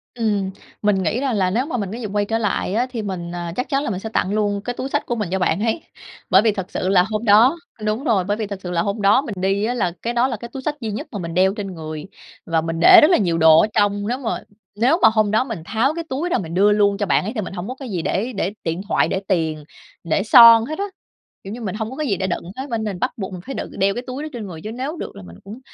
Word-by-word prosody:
Ừm. 205 -5 -1 0.3
Mình 205 -2 +2
nghĩ 185 +8 0
ra 270 -2 -1
là 190 -4 +1
nếu 235 +7 0
mà 290 -5 -3
mình 200 -4 -3
có 225 - -5
dịp 225 -4 -5
quay 205 0 +1
trở 225 +2 -1
lại 205 -3 -1
á, 245 +4 +1
thì 240 -3 -4
mình, 185 -4 -5
à, 175 -1 -4
chắc 250 - -3
chắn 275 +1 0
là - - -2
mình 190 -3 -3
sẽ 220 - -6
tặng 200 -2 -1
luôn 205 -1 0
cái 245 +3 -4
túi 265 - -3
xách 290 - -1
của 240 - -2
mình 210 -6 -3
cho 190 - 0
bạn 180 -1 +1
ấy. 230 +8 0 0.5
Bởi 190 - +6
vì 220 0 +3
thật 190 -3 -6
sự 185 - -2
là 185 -2 +5
hôm 215 +1 -2
đó 225 +8 +6 0.3
đúng 215 +4 -1
rồi, 215 -10 +2
bởi 205 +3 -1
vì 215 - -3
thật 200 -1 -6
sự 180 - -5
là 170 -1 +1
hôm 200 +3 -2
đó 205 +6 +5
mình 235 -8 -6
đi 195 +2 +1
á, 240 - -1
là 185 -8 0
cái 235 - -2
đó 240 +2 +2
là 235 -5 -3
cái 235 +2 -9
túi 265 - -5
xách 295 +2 -2
duy 220 -2 -3
nhất 205 - -5
mà 205 - -5
mình 170 -2 -5
đeo 190 +2 +3
trên 200 -3 -6
người, 155 -2 -6 0.4
và 165 -1 +1
mình 165 0 -3
để 345 - +9
rất 310 +4 +5
là - - +5
nhiều 170 -5 0
đồ 160 0 +7
ở - - +2
trong. 205 -1 +1
Nếu 245 +3 -1
mà 255 -4 -3 0.4
nếu 255 - +2
mà 225 - +8
hôm 215 -2 +2
đó 220 +3 +3
mình 225 -8 -6
tháo 230 - +1
cái 335 - -3
túi 290 +7 -2
ra - - +2
mình 165 -3 -5
đưa 200 +4 +4
luôn 205 -1 +3
cho 205 - -1
bạn 190 - +2
ấy 215 - -3
thì 215 - -1
mình 190 - -7
hổng 180 0 -5
có 255 - -5
cái 265 -2 -8
gì 180 -5 -2
để 215 +10 -2
để 195 -1 -2
điện 165 +2 -2
thoại, - - +2
để 190 - -1
tiền, 160 -5 -1 0.4
để 170 +3 0
son 230 0 +8
hết 310 +5 -5
á. 400 - 0 0.6
Kiểu 195 - -7
như, 240 - -7
mình 195 -3 -4
hông 220 0 -3
có 265 - -8
cái 305 -1 -2
gì 200 -6 0
để 190 - -2
đựng 175 - -3
hết 270 +2 -5
bên 230 -2 -2
nên 210 -2 -2
mình 180 - -10
bắt 255 - 0
buộc 190 -3 -5
mình 180 - -7
phải 270 - -6
đựng - - -5
đeo 195 +1 +3
cái 245 - -5
túi 260 +4 -5
đó 310 - -5
trên 225 -4 -6
người, 165 -4 -9
chứ 215 - -5
nếu 265 +8 -4
được - - -7
là 95 - -10
mình 85 -1 -12
cũng 210 +5 -9
210 Hz, 320 wpm, -21 LUFS, 190-240 Hz, 0.6 s, để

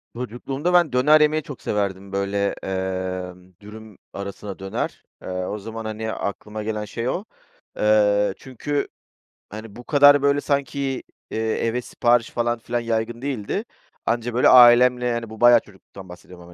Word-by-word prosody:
Çocukluğumda 135 +7 -3
ben 170 -6 +4
döner 150 +5 +5
yemeyi 150 0 +2
çok 145 - -10
severdim. 100 -1 -3
Böyle, 100 +1 -1 0.2
emm, 95 -1 -4
dürüm 105 0 -12 0.2
arasına 100 0 -7
döner, 95 0 -4 0.2
eee, - - -10
o 90 +3 -3
zaman, 115 +2 -7
hani, 110 0 -4
aklıma 105 +1 -5
gelen 105 0 -3
şey 115 +4 -4
o. 185 - -2 0.5
Eee, 105 -2 +3
çünkü, 140 +3 -4 0.6
hani, 110 0 -9
bu 120 - -10
kadar, 145 +1 +6
böyle, 140 0 +2
sanki, 140 -2 -2 0.3
iii, - - -3
eve 115 +2 -1
sipariş 120 -1 +1
falan 120 0 -1
filan 120 +1 -2
yaygın 115 0 -2
değildi. 135 - -3 0.4
Anca 120 +1 -1
böyle 125 - +4
ailemle, 125 0 +7
yani, 120 -2 -2
bu 110 - -11
bayağı 120 0 +8
çocukluktan 95 -2 -15
bahsediyorum 90 0 -13
ama - - -14
115 Hz, 150 wpm, -22 LUFS, 100-125 Hz, 0.6 s, bayağı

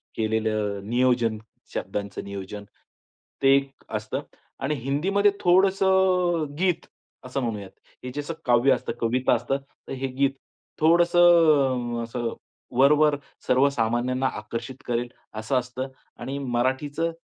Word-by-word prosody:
केलेलं 110 -2 -1
नियोजन, 120 -2 +2 0.4
शब्दांच 100 +2 -4
नियोजन. 100 +1 -6 0.8
ते 135 0 +6
एक 140 0 0 0.2
असतं 110 0 -3 0.4
आणि 145 +3 0
हिंदीमध्ये 175 - +1
थोडंसं 190 -1 +3
अ, - - -1
गीत 180 -2 +1 0.4
असं 130 +2 -3
म्हणूयात. 105 -5 -4 0.3
हे 125 - -5
जसं 145 +3 -3
काव्य 120 +2 +4
असतं - - -3
कविता 125 +3 +2
असतात 125 +3 0 0.3
तर - - -5
हे 135 0 -3
गीत. 135 +1 +1 0.5
थोडंसं 160 -7 +4
अ, - - -3
असं 115 0 -3 0.4
वरवर 150 +2 +5 0.3
सर्व 130 +3 +4
सामान्यांना 125 +1 0
आकर्षित 120 +3 -7
करेल 120 0 -1 0.3
असं 110 +5 0
असतं. 125 +2 -5 0.3
आणि 135 +3 -5
मराठीचं 135 +5 -1
130 Hz, 120 wpm, -25 LUFS, 120-150 Hz, 0.8 s, ते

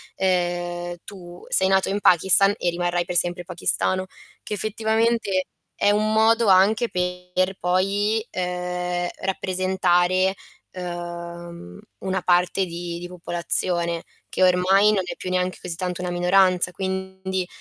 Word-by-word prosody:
ehm, 175 -1 -1
tu 175 -3 -11
sei 190 - +3
nato 190 0 +2
in 200 +1 -1
Pakistan 190 +3 +5
e 175 - 0
rimarrai 175 0 -1
per 180 - -5
sempre 175 0 +1
pakistano, 185 +1 0 0.4
che - - -5
effettivamente 220 -1 0 0.3
è 205 - +2
un 215 +1 +1
modo 225 +1 +3
anche 200 +5 +4
per 180 +1 -2
poi 200 +5 0
ehm, 180 -1 -3
rappresentare, 185 0 +1 0.4
uhm, 170 - -7 0.2
una 190 -1 -2
parte 180 +2 +2
di 170 0 -6
di 175 - -7
popolazione, 170 -1 -2 0.3
che - - -4
ormai 185 +3 +4
non 195 -3 +1
è - - -5
più 185 - -6
neanche 185 0 -1
così 180 -2 -5
tanto 180 +1 -4
una 180 - -3
minoranza 180 0 +3
quindi 190 0 -4
180 Hz, 130 wpm, -23 LUFS, 175-190 Hz, 0.4 s, Pakistan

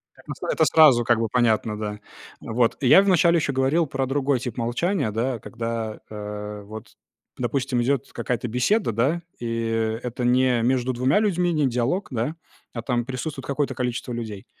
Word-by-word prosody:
Как - - -21
на - - -4
с - - -22
это - - +3
сразу 140 -7 +6
как 120 -1 +3
бы 115 -1 0
понятно, 110 -2 +1
да. 105 -1 -5 0.4
Вот. 115 +1 0
Я 140 +9 +7
вначале 175 -3 +4
ещё 150 -4 0
говорил 135 +5 +2
про 135 -1 -2
другой 135 -1 0
тип 125 -3 -5
молчания, 120 - 0
да, 120 +3 -1
когда, 115 -1 -5
а, 105 0 -6
вот, 110 +1 -10 0.4
допустим, 125 0 -1
идёт 135 +2 -1
какая-то 125 -1 -2
беседа, 125 - +1
да, 140 +10 0 0.2
и 115 -1 -1
это 125 0 -4
не 125 -1 +3
между 130 +1 +1
2 130 +4 +2
людьми, 180 -4 +1
не 150 -3 +2
диалог, 125 +10 -1
да, 125 +5 -2 0.4
а, 115 - -4
там 120 -1 -1
присутствует 135 +2 -5
какое-то 140 -1 -1
количество 125 0 -3
людей. 110 -2 -6
125 Hz, 175 wpm, -24 LUFS, 115-140 Hz, 0.4 s, Я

